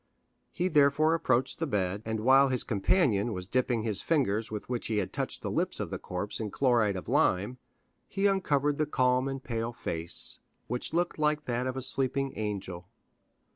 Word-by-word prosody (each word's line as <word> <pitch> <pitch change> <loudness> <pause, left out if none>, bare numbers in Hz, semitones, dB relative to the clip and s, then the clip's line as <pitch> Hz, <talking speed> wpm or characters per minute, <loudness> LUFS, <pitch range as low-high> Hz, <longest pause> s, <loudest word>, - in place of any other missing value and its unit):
He 180 0 -1
therefore 150 -1 +4
approached 130 -6 +1
the 165 - -1
bed, 100 -4 -1
and 110 -1 -2
while 135 +3 +5
his 130 -1 0
companion 110 - +1
was 90 -2 -5
dipping 120 +1 0
the 110 -1 -1
fingers 110 - 0
with 105 -1 -6
which 120 -1 -3
he 110 - -1
had 100 - -2
touched - - -3
the - - -2
lips - - 0
of - - -4
the - - -4
corpse 90 +3 -3
in 110 -2 -3
chloride 115 -5 +2
of 95 - -6
lime, 105 +8 +1 0.5
he 195 0 -1
uncovered 150 -8 +2
the 155 - +1
calm 130 -1 +2
and 135 -1 -4
pale 115 -1 -3
face, 85 -5 -3 0.3
which 125 +1 -3
looked 170 0 -1
like 150 0 +1
that 125 +1 -1
of 130 0 -3
a 130 - -1
sleeping 135 +1 0
angel. 95 -5 -4
125 Hz, 185 wpm, -29 LUFS, 105-140 Hz, 0.5 s, while